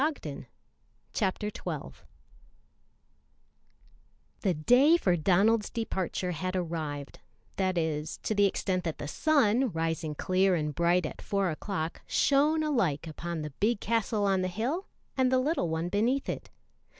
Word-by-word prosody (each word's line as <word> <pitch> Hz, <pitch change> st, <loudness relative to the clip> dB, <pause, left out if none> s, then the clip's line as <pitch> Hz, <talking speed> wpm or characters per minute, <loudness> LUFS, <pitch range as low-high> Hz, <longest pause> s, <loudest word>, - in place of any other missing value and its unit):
[Illustration: 310 Hz, -1 st, -3 dB, 0.7 s
9119] 190 Hz, -, -3 dB, 2.4 s
The 185 Hz, -4 st, +1 dB
day 255 Hz, -, +5 dB
for 185 Hz, -, +2 dB
Donald's 200 Hz, +6 st, +3 dB
departure 190 Hz, -5 st, -2 dB
had 185 Hz, +3 st, -3 dB
arrived 155 Hz, -5 st, -4 dB, 0.4 s
that 185 Hz, -1 st, 0 dB
is, 155 Hz, -1 st, -1 dB
to -, -, 0 dB
the 205 Hz, -1 st, +4 dB
extent 185 Hz, -1 st, -1 dB
that 165 Hz, -4 st, -3 dB
the 145 Hz, -, -5 dB
sun, 255 Hz, -, +2 dB
rising 160 Hz, -2 st, -2 dB
clear 185 Hz, +3 st, +2 dB
and 150 Hz, -2 st, -1 dB
bright 170 Hz, +3 st, +2 dB
at -, -, -6 dB
four 200 Hz, -3 st, 0 dB
o'clock, 160 Hz, 0 st, -4 dB
shone 300 Hz, +3 st, +3 dB
alike 190 Hz, -, 0 dB
upon 165 Hz, 0 st, -5 dB
the 150 Hz, -, -5 dB
big 215 Hz, +1 st, +2 dB
castle 220 Hz, -1 st, 0 dB
on 195 Hz, -1 st, +2 dB
the 185 Hz, -, 0 dB
hill 245 Hz, -, -2 dB, 0.3 s
and 260 Hz, -2 st, +2 dB
the 260 Hz, -, +4 dB
little 255 Hz, -, 0 dB
one 160 Hz, +1 st, -1 dB
beneath 230 Hz, +9 st, +1 dB
it. -, -, -4 dB
185 Hz, 140 wpm, -29 LUFS, 165-230 Hz, 2.4 s, day